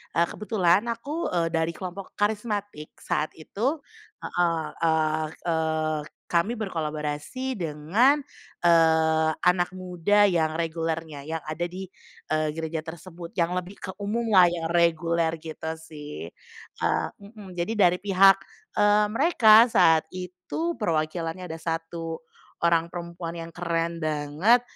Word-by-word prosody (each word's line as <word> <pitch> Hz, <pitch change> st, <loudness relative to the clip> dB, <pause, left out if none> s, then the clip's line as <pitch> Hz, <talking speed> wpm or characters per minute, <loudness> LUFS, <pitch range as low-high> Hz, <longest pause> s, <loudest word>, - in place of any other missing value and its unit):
eee, 170 Hz, 0 st, +3 dB
kebetulan 205 Hz, -1 st, +2 dB
aku, 280 Hz, +8 st, -3 dB
eee, 165 Hz, -1 st, +2 dB
dari 165 Hz, 0 st, 0 dB
kelompok 185 Hz, +1 st, -7 dB
karismatik, 205 Hz, -6 st, -2 dB
saat 155 Hz, -3 st, -2 dB
itu 225 Hz, -, -2 dB, 0.5 s
heeh, 170 Hz, -2 st, 0 dB, 0.2 s
eee 155 Hz, -1 st, +2 dB, 0.2 s
eee, 160 Hz, -1 st, 0 dB, 0.3 s
kami 175 Hz, +7 st, +2 dB
berkolaborasi 160 Hz, -, -3 dB
dengan, 175 Hz, -, +2 dB, 0.4 s
eee, 160 Hz, -1 st, +4 dB
anak 180 Hz, 0 st, +2 dB
muda 185 Hz, +3 st, +2 dB
yang 160 Hz, -3 st, +1 dB
regulernya, 160 Hz, -3 st, -3 dB
yang 160 Hz, -1 st, -3 dB
ada 155 Hz, +3 st, -3 dB
di, 185 Hz, +1 st, -8 dB, 0.4 s
eee, 155 Hz, 0 st, +1 dB
gereja 160 Hz, 0 st, -3 dB
tersebut, 170 Hz, +1 st, -9 dB
yang 170 Hz, -1 st, +1 dB
lebih 180 Hz, +2 st, -5 dB
ke 190 Hz, -, -5 dB
umum 225 Hz, +3 st, -2 dB
lah 185 Hz, -3 st, +8 dB
ya 170 Hz, -1 st, -2 dB
reguler 170 Hz, -1 st, +2 dB
gitu 160 Hz, 0 st, -5 dB
sih. 150 Hz, -, -9 dB, 0.5 s
Eee -, -, +1 dB
mhm, 200 Hz, -2 st, -12 dB
jadi 175 Hz, +6 st, -1 dB
dari 180 Hz, -3 st, +4 dB
pihak, 195 Hz, -1 st, +6 dB, 0.4 s
eee, 210 Hz, 0 st, +4 dB
mereka 225 Hz, -4 st, +6 dB
saat 160 Hz, -1 st, +5 dB
itu 185 Hz, -, -4 dB
perwakilannya 165 Hz, -1 st, -2 dB
ada 160 Hz, -, -4 dB
1 165 Hz, 0 st, -4 dB, 0.4 s
orang 170 Hz, 0 st, +2 dB
perempuan 170 Hz, -1 st, -6 dB
yang 165 Hz, 0 st, -6 dB
keren 170 Hz, -1 st, -1 dB
banget, 155 Hz, +10 st, +2 dB
170 Hz, 125 wpm, -26 LUFS, 160-195 Hz, 0.5 s, lah